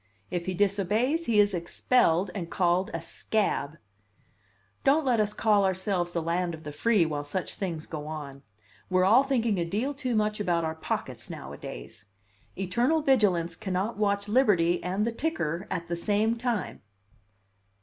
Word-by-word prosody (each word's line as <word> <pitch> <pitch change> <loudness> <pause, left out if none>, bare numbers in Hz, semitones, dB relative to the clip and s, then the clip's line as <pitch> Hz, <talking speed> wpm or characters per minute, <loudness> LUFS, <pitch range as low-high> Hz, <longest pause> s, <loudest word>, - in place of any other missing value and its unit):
If 175 0 -3
he 185 - -1
disobeys, 205 - +1
he 220 -3 +3
is 205 -1 +4
expelled 180 +1 +2
and 170 -3 -5
called 180 +1 +1
a 165 -1 -4
'scab.' 165 -6 -1 1.1
Don't 290 +2 +3
let 245 -4 +2
us 210 -1 +1
call 210 -2 +3
ourselves 185 -2 0
the 170 -2 -2
land 170 +1 -1
of 160 - -14
the 150 - -6
free 210 +3 +2
while 150 -2 -3
such 160 +6 -3
things 170 -5 -4
go 150 -2 -6
on. 145 -3 -7 0.5
We're 185 0 +3
all 225 +7 +6
thinking 235 -7 0
a - - +1
deal 215 +12 -2
too 260 -4 -2
much 210 0 +1
about 175 -5 +1
our 160 - -2
pockets 160 - -4
nowadays. 100 - -8 0.5
Eternal 240 - +1
vigilance 190 - +2
cannot 195 +3 -2
watch 200 -1 0
liberty 200 -8 +3
and 190 +4 0
the 235 - 0
ticker 215 - -2
at 170 -2 -3
the 170 - -2
same 210 +5 +1
time. 235 -4 -2
190 Hz, 160 wpm, -28 LUFS, 170-220 Hz, 1.1 s, all